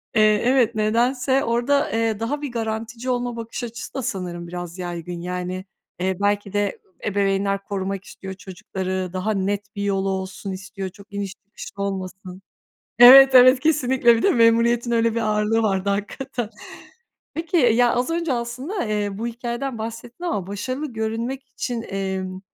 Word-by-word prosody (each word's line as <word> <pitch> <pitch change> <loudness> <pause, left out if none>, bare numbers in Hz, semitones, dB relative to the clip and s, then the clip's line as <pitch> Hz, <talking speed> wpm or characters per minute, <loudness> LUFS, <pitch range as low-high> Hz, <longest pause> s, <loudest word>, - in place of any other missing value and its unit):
Eee, 215 -1 +4
evet, 245 -3 +3
nedense 250 +5 +2
orada, 240 +5 +1
eee, 225 -1 0
daha 285 +6 -2
bir 285 -4 -4
garantici 225 +2 -4
olma 245 -1 -1
bakış 230 +2 -6
açısı 235 -1 -7
da 270 - -3
sanırım 180 -7 -4
biraz 175 0 -6
yaygın. 175 -1 -5
Yani, 180 +1 -4 0.3
eee, 185 0 0
belki 205 -1 0
de, 205 - +2 0.3
ııı, 185 - -33 0.2
ebeveynler 195 0 0
korumak 195 -1 -3
istiyor 190 0 -9
çocukları, 185 -1 -5
daha 200 +4 -1
net 205 +1 -2
bir 200 - -3
yolu 195 -1 0
olsun 190 +1 -4
istiyor. 190 0 -6
Çok 200 +1 -17
iniş 200 -1 -3
çıkış 205 - -10
olmasın 190 -1 -5 0.6
Evet, 265 +2 +10
evet, 255 +1 +8
kesinlikle. 260 -6 +3
Bir - - -2
de 400 - +4
memuriyetin 235 +1 +3
öyle 230 -1 +2
bir 230 - 0
ağırlığı 215 +1 +1
vardı 195 -2 0
hakikaten. 235 +3 -3 0.8
Peki, 330 +2 -2
ya, 245 -3 +4
az 250 +6 0
önce 335 -4 0
aslında, 255 - -3
eee, 205 -1 -2
bu 230 - -2
hikâyeden 240 +1 -4
bahsettin 230 +8 -7
ama 200 - -2
başarılı 255 +7 -4
görünmek 230 +5 -3
için, 240 -3 -4
emm, 190 -1 -3
220 Hz, 155 wpm, -23 LUFS, 195-245 Hz, 0.8 s, Evet